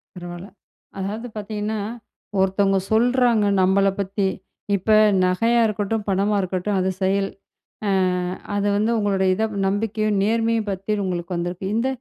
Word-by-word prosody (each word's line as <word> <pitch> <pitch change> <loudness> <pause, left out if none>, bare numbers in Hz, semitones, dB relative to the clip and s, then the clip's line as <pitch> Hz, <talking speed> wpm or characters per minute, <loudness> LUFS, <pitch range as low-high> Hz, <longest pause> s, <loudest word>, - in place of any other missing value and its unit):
பரவால்ல. 175 +1 -8 0.5
அதாவது 215 +5 -4
பார்த்தீங்கன்னா, 210 +1 -3 0.6
ஒருத்தவங்க 195 0 +2
சொல்றாங்க 240 -1 +3 0.2
நம்மள 195 +1 +3
பத்தி. 195 0 0 0.5
இப்ப 200 +3 -1 0.3
நகையா 230 +6 +2
இருக்கட்டும், 210 0 -2
பணமா 200 +2 +1
இருக்கட்டும் 185 +2 -1
அது 185 - +1
செயல். 195 +1 +1 0.6
அ - - +1 0.7
அது 205 0 0
வந்து 215 +3 +1
உங்களோடைய 195 -3 +1
இத 220 - -1 0.2
நம்பிக்கையும், 215 +1 0
நேர்மையும் 225 0 +1
பத்தி 195 +2 -2
உங்களுக்கு 175 -1 -3
வந்திருக்கு. 175 +2 -3
இந்த 230 +3 +1
200 Hz, 125 wpm, -22 LUFS, 190-220 Hz, 0.7 s, சொல்றாங்க